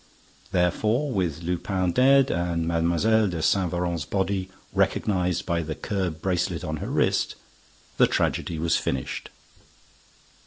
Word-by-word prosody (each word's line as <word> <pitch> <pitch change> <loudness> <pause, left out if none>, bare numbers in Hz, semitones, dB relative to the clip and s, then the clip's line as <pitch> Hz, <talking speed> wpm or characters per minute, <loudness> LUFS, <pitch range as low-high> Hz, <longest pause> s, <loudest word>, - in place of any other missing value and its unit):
Therefore, 105 - +1
with 90 - -1
Lupin 90 +1 -1
dead 135 +5 +5
and 85 -1 -1
Mlle. 85 +7 +2
de 85 -2 -3
Saint 90 +2 +2
Véran's 85 -3 -1
body 95 0 -1 0.2
recognized 90 -3 +1
by 85 -2 0
the 80 -1 -4
curb 95 -7 -3
bracelet 90 -2 -1
on 80 0 -3
her - - -5
wrist, - - +1 0.6
the - - +6
tragedy 85 - -1
was 85 +1 +1
finished. 65 -1 -3
90 Hz, 125 wpm, -25 LUFS, 85-100 Hz, 0.6 s, the